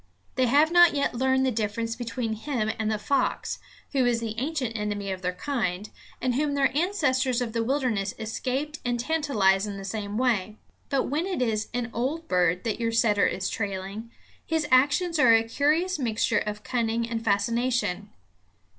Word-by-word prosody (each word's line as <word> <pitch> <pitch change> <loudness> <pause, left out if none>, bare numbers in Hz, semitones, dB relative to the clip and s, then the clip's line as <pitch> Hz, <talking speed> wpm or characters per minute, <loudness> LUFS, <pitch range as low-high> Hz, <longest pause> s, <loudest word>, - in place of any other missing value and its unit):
They 255 -1 +2
have 295 +6 +4
not 345 -2 +6
yet 280 - 0
learned 265 +2 +2
the 260 - +2
difference 225 +1 -2
between 230 -1 -3
him 220 -1 -2
and 215 -1 0
the 215 - 0
fox, 260 +5 -1 0.3
who 270 -3 +2
is 240 -1 +2
the 225 -2 -3
ancient 265 -4 -2
enemy 205 -2 -2
of 185 -1 -5
their 180 0 -1
kind, 205 -2 -2 0.3
and 255 0 0
whom 285 +2 0
their 275 -1 +2
ancestors 275 -8 +1
of 240 -3 -3
the 230 -1 0
wilderness 230 -6 -1
escaped 260 +7 -3
and 245 -1 -1
tantalized 230 -10 +2
in 200 -1 -5
the 195 - -7
same 205 +1 -4
way. 220 -4 0 0.3
But 275 -2 +1
when 310 +7 -1
it 375 -6 -2
is 220 -4 0
an 240 -1 -3
old 285 +8 -2
bird 180 -1 +2
that 225 -1 -2
your 230 -1 0
setter 215 -3 +3
is 190 +1 -2
trailing, 200 +2 -4 0.3
his 320 -2 -1
actions 290 +6 +3
are 235 -6 +7
a 225 - +3
curious 305 +9 +1
mixture 225 -3 +1
of 210 0 -5
cunning 230 -1 -1
and 230 -1 -3
fascination. 220 -1 0
235 Hz, 180 wpm, -26 LUFS, 215-275 Hz, 0.3 s, are